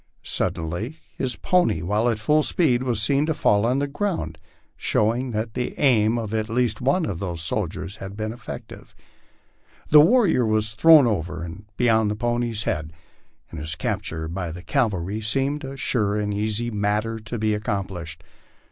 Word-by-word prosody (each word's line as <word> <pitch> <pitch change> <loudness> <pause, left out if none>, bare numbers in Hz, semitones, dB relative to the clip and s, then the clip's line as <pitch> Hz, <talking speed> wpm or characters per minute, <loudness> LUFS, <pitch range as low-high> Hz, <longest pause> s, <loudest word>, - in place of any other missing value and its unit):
Suddenly 85 - -3 0.2
his 125 -1 -2
pony, 180 - +1
while 105 +6 +1
at 115 - 0
full 150 +9 +2
speed, 140 -6 +2
was 125 -4 +1
seen 140 +7 +3
to 160 - 0
fall 105 0 +2
to 130 - +1
the 140 +1 0
ground, 140 - -3 0.4
showing 120 +4 0
that 110 0 -3
the 125 - -3
aim 115 -5 +3
of 110 -2 -4
at 110 0 -1
*east 115 -2 0
one 140 +7 +2
of 90 - -4
the 90 -3 -3
soldiers 95 +3 -2
had 95 +1 -8
been 110 0 -3
effective. 120 -1 -10 1.0
The 150 0 +9
warrior 185 - +4
was 110 -1 +1
thrown 155 +4 +7
over 90 -6 -2
and 85 +4 -8
beyond 110 -3 +3
the 105 - -1
pony's 120 -1 -1
head, 75 0 -3 0.6
and - - -7
his 80 +2 -3
capture 80 -1 -2
by 85 0 -4
the 90 +2 -9
cavalry 105 - -1
seemed 135 +7 0
a 135 0 -7
sure 105 -6 0
and 105 -1 -1
easy 110 +3 -1
matter 105 +2 -1
to 110 +2 -6
be 110 0 +1
accomplished. 100 -6 -4
110 Hz, 170 wpm, -23 LUFS, 100-125 Hz, 1.0 s, The